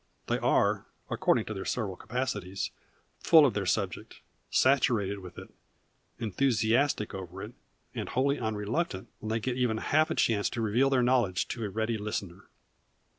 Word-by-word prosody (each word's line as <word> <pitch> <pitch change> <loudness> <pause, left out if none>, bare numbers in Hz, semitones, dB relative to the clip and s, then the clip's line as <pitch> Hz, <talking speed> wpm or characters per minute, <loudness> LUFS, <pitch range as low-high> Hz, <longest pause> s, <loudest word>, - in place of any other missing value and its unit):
They - - 0
are, - - +2 0.2
according - - +2
to 110 - -4
their 95 -2 -5
several 100 -3 -2
capacities, 105 -5 -3 0.5
full 160 -3 +7
of 130 - +2
their 100 -2 -2
subject, 95 0 -2 0.3
saturated 115 -7 +2
with 90 -2 -11
it, - - -10 0.6
enthusiastic 115 +1 +1
over 95 0 -7
it, 110 +4 -8 0.4
and - - -4
wholly 140 +3 +1
unreluctant 110 - -2
when 110 - -6
they 110 +1 0
get 125 +2 -2
even 120 -3 +1
half 155 +7 +2
a - - -1
chance 105 -3 +2
to 115 - -4
reveal 115 +5 +2
their 130 -2 +3
knowledge 120 -7 +2
to 115 - -4
a - - -3
ready 110 +2 -1
listener. 100 -3 -5
110 Hz, 160 wpm, -29 LUFS, 100-125 Hz, 0.6 s, full